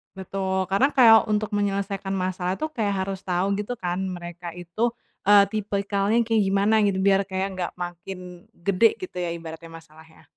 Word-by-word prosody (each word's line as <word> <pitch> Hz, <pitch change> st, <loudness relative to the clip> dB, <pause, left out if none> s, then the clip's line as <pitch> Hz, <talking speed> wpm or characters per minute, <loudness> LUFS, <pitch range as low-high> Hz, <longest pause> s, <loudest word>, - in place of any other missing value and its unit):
Betul, 190 Hz, 0 st, -2 dB
karena 200 Hz, +8 st, +4 dB
kayak 230 Hz, -4 st, +8 dB
untuk 215 Hz, +1 st, 0 dB
menyelesaikan 200 Hz, -1 st, -1 dB
masalah 185 Hz, 0 st, -2 dB
tuh 310 Hz, +8 st, -4 dB
kayak 200 Hz, -7 st, -1 dB
harus 195 Hz, 0 st, -4 dB
tahu, 185 Hz, +1 st, -1 dB
gitu 210 Hz, +4 st, -3 dB
kan, 180 Hz, -5 st, -3 dB
mereka 175 Hz, -2 st, -6 dB
itu, 175 Hz, +6 st, -2 dB, 0.4 s
eee, 205 Hz, -1 st, +8 dB
tipikalnya 200 Hz, +1 st, 0 dB
kayak 225 Hz, -1 st, +1 dB
gimana, 200 Hz, +3 st, +3 dB
gitu, 190 Hz, -1 st, 0 dB
biar 195 Hz, 0 st, +3 dB
kayak 190 Hz, 0 st, -2 dB
nggak 185 Hz, -2 st, -4 dB
makin 180 Hz, 0 st, -8 dB
gede, 200 Hz, +5 st, +2 dB
gitu 370 Hz, -, -9 dB
ya, 170 Hz, -1 st, -2 dB
ibaratnya 165 Hz, 0 st, -9 dB
masalahnya. 160 Hz, -1 st, -15 dB
195 Hz, 160 wpm, -24 LUFS, 180-205 Hz, 0.4 s, kayak